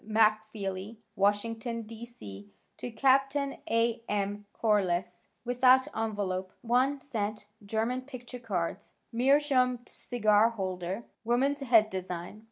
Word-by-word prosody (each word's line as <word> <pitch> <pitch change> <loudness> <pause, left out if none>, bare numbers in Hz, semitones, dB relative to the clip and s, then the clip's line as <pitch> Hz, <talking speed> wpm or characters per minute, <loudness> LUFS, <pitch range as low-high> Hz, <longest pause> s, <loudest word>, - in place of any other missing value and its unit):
MacFeeley, 215 -2 0 0.2
Washington, 225 +3 0
D. 225 +1 -8
C., 100 - -10 0.3
to - - -5
Capt. 270 +3 +3
A. 235 -5 0
M. 205 0 -2
Corliss, 180 -5 0 0.2
without 255 +2 +5
envelope, 200 -4 -2
one 255 +4 +2
cent, 215 -6 -3 0.2
German 225 +5 -1
picture 255 -2 -9
cards, 190 -3 -3 0.2
meerschaum 255 0 +3
cigar 215 -2 +2
holder, 190 -1 -4 0.2
woman's 260 +5 +1
head 230 -5 +4
design. 185 +1 -5
225 Hz, 105 wpm, -30 LUFS, 200-245 Hz, 0.3 s, without